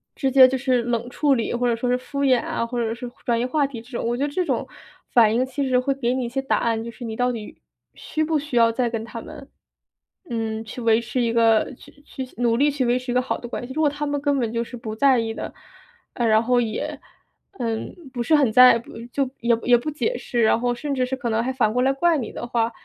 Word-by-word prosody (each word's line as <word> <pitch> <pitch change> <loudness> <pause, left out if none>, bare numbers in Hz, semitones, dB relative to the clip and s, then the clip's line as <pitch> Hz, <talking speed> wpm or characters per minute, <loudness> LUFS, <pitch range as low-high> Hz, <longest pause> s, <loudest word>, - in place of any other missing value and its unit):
直 270 - 0
接 265 -1 +9
就 265 +1 -1
是 255 -2 +1
冷 235 0 -2
处 285 +3 +2
理， 230 -3 -2
或 245 +1 0
者 235 - +2
说 245 +2 -2
是 250 - +2
敷 280 +2 -5
衍 255 -3 +4
啊， 230 - -2
或 245 +1 -3
者 225 -1 -1
是 240 +1 -7 0.2
转 235 -1 +1
移 240 - 0
话 285 +3 +1
题 245 -5 -8
这 240 - -18
种， - - -3
我 240 - 0
觉 270 - -1
得 - - -4
这 365 +4 0
种 - - -1 0.5
反 225 -3 +5
应 250 +2 +2
其 270 +1 -3
实 255 -1 +3
会 275 +2 0
给 245 -2 0
你 255 -1 -1
一 - - -4
些 270 +3 -2
答 270 - +1
案， 225 -1 0
就 235 - -6
是 230 +2 -11
你 220 -1 -5
到 250 +2 +1
底 220 -3 -8 0.4
需 310 - -4
不 315 0 +1
需 290 -3 -6
要 230 -1 +5
再 240 +1 0
跟 225 -1 -3
他 230 0 -7
们， 275 +3 -11 0.8
嗯， 225 -1 -3
去 240 +3 -8
维 225 0 +3
持 240 +2 -3
一 230 -1 0
个 225 +1 +3
去 290 - -18
去 265 -2 -7
努 235 -1 +2
力 290 +3 +4
去 275 -2 -1
维 245 +1 +2
持 250 0 -5
一 - - -2
个 250 - +4
好 - - -2
的 240 - -7
关 245 - -5
系。 260 - -7
如 315 - -1
果 300 - +4
他 290 +1 -4
们 285 0 -2
根 285 -1 +1
本 230 -2 -2
就 235 0 0
是 245 +1 -9
不 220 -2 -6
在 265 +2 +4
意 225 -1 -2
的， - - -6 0.6
呃， 240 - -1
然 220 +1 +4
后 245 +1 +2
也， 220 -2 -3 0.6
嗯， 225 -2 -3 0.2
不 245 - -3
是 310 +7 +3
很 280 -6 +3
在 250 0 +8
不 230 - -14 0.2
就 275 -2 0
也 235 -1 +3
也 245 0 +5
不 240 +6 -4
解 390 +11 -1
释， 240 -2 -2
然 220 - +3
后 245 0 0
甚 280 +3 -3
至 255 -1 +1
是 260 +1 -3
可 260 -3 -4
能 225 +1 +1
还 260 - -2
反 230 -5 +1
过 250 - +1
来 270 +1 +3
怪 335 +3 +2
你 250 - -4
的 - - -6
话， 235 -1 0
245 Hz, 300 characters per minute, -23 LUFS, 230-270 Hz, 0.8 s, 接